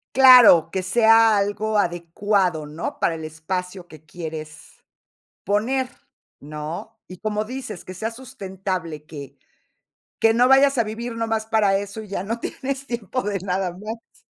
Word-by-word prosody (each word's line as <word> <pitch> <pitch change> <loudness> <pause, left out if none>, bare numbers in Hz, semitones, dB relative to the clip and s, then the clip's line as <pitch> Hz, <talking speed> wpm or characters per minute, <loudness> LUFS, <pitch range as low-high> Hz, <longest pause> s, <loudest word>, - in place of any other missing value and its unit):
Claro, 250 -10 +8
que 190 - -1
sea 225 +2 +5
algo 210 +2 -1
adecuado, 175 -1 0
¿no? 150 +3 -6
Para 165 - +1
el 160 - -8
espacio 180 +4 -5
que 155 -3 -15
quieres 155 -2 -9 0.6
poner, 245 +6 0 0.5
¿no? 155 +9 -7
Y, 185 - -10
como 215 +1 -2
dices, 235 -4 -7
que 185 - -9
sea 220 +5 -3
sustentable, 190 - -6
que, 140 -3 -10 0.8
que 225 0 +4
no 245 +2 +4
vayas 270 0 +5
a 235 - +3
vivir 230 +2 -6
nomás 225 -1 -1
para 210 -3 +2
eso, 200 +2 -6
y 215 - -11
ya 195 -2 -3
no 230 +3 -3
tienes 275 +2 -5
tiempo 235 0 -3
de 200 -1 -2
nada 185 0 -2
más. 215 +5 -10
205 Hz, 150 wpm, -22 LUFS, 175-225 Hz, 0.8 s, Claro